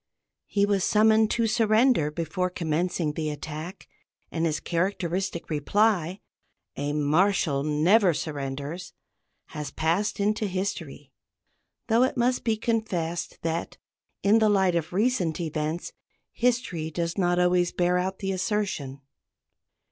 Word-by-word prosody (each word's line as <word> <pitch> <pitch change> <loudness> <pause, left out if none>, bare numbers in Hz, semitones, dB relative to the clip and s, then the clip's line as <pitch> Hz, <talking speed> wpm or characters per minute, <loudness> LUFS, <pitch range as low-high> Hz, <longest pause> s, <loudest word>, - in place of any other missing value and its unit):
He 200 -1 +2
was 200 -2 +1
summoned 220 0 +4
to 230 0 +1
surrender 220 - +3
before 170 +4 -2
commencing 165 -1 -1
the 155 0 -2
attack, 155 +4 -7 0.4
and 165 0 0
his 155 -1 -1
characteristic 180 0 -2
reply, 180 +3 +1 0.5
"A 145 +1 -2
Marshal 150 0 +2
of 140 - -2
France 150 0 0
never 195 0 +5
surrenders," 145 +4 -5 0.6
has 150 -2 -5
passed 180 +9 0
into 210 +1 +1
history, 190 +1 -4 0.7
though 230 +1 +3
it 260 +1 +1
must 245 +1 +1
be 225 -2 +1
confessed 200 -8 -2
that, 165 +1 -3 0.5
in 205 +3 +5
the 215 -1 +4
light 190 -3 +3
of 165 -2 -1
recent 190 -5 +1
events, 155 0 -3 0.4
history 235 -10 0
does 170 +1 -2
not 175 -2 +1
always 180 0 +3
bear 180 0 +1
out 190 +1 -2
the 195 -1 -3
assertion. 185 - -2
180 Hz, 130 wpm, -26 LUFS, 160-210 Hz, 0.7 s, never